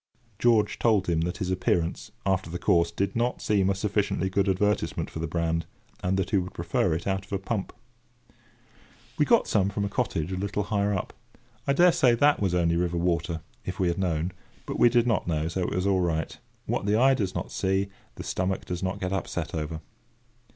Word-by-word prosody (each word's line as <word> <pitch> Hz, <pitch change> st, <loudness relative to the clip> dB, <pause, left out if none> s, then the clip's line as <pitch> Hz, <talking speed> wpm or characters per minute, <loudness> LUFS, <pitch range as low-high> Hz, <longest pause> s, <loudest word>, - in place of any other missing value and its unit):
George 115 Hz, -3 st, +3 dB
told 110 Hz, -5 st, +3 dB
him 85 Hz, -3 st, +1 dB
that 90 Hz, +4 st, -2 dB
his 95 Hz, -1 st, -2 dB
appearance, 90 Hz, -2 st, 0 dB
after 95 Hz, -3 st, 0 dB
the 85 Hz, -, -4 dB
course, 85 Hz, -1 st, +3 dB
did 100 Hz, +3 st, -2 dB
not 120 Hz, +1 st, 0 dB
seem 100 Hz, -2 st, +2 dB
a 100 Hz, -, +1 dB
sufficiently 100 Hz, -1 st, 0 dB
good 100 Hz, +1 st, +2 dB
advertisement 105 Hz, +2 st, 0 dB
for -, -, -6 dB
the 80 Hz, -, -2 dB
brand; 85 Hz, 0 st, -1 dB, 0.3 s
and 95 Hz, +1 st, 0 dB
that 95 Hz, -1 st, -1 dB
he 100 Hz, -, +4 dB
would 90 Hz, 0 st, -3 dB
prefer -, -, 0 dB
it 85 Hz, -, -5 dB
out 95 Hz, 0 st, -1 dB
of 95 Hz, -, -19 dB
a 100 Hz, -, +1 dB
pump. 100 Hz, 0 st, -3 dB, 1.5 s
We -, -, +5 dB
got -, -, +4 dB
some 100 Hz, -1 st, +2 dB
from 100 Hz, 0 st, -2 dB
a -, -, -2 dB
cottage 85 Hz, -4 st, -1 dB
a 95 Hz, -, -2 dB
little 100 Hz, +2 st, -1 dB
higher 100 Hz, 0 st, 0 dB
up. 95 Hz, -3 st, -2 dB, 0.5 s
I 140 Hz, -, +4 dB
daresay 150 Hz, -7 st, +5 dB
that 145 Hz, +5 st, +4 dB
was 95 Hz, -3 st, +1 dB
only 85 Hz, -1 st, +2 dB
river 85 Hz, 0 st, 0 dB
water, 85 Hz, -1 st, 0 dB, 0.2 s
if 95 Hz, +1 st, -5 dB
we 90 Hz, -2 st, +2 dB
had 85 Hz, -, -2 dB
known. 85 Hz, -2 st, 0 dB, 0.3 s
But -, -, -4 dB
we 120 Hz, -, +7 dB
did 120 Hz, 0 st, +3 dB
not 115 Hz, -7 st, +1 dB
know, 80 Hz, -2 st, 0 dB
so 85 Hz, +3 st, -2 dB
it 90 Hz, -, -1 dB
was 90 Hz, +1 st, 0 dB
all 95 Hz, -2 st, +3 dB
right. 80 Hz, -2 st, -1 dB, 0.3 s
What -, -, -2 dB
the 105 Hz, -, +3 dB
eye 130 Hz, +4 st, +5 dB
does 100 Hz, -8 st, -1 dB
not -, -, -4 dB
see, 95 Hz, +1 st, 0 dB, 0.3 s
the -, -, -7 dB
stomach 95 Hz, +1 st, -2 dB
does 90 Hz, -1 st, -4 dB
not 95 Hz, +1 st, -2 dB
get 95 Hz, 0 st, -2 dB
upset 90 Hz, -3 st, -3 dB
over. 80 Hz, 0 st, -3 dB
95 Hz, 215 wpm, -27 LUFS, 85-100 Hz, 1.5 s, we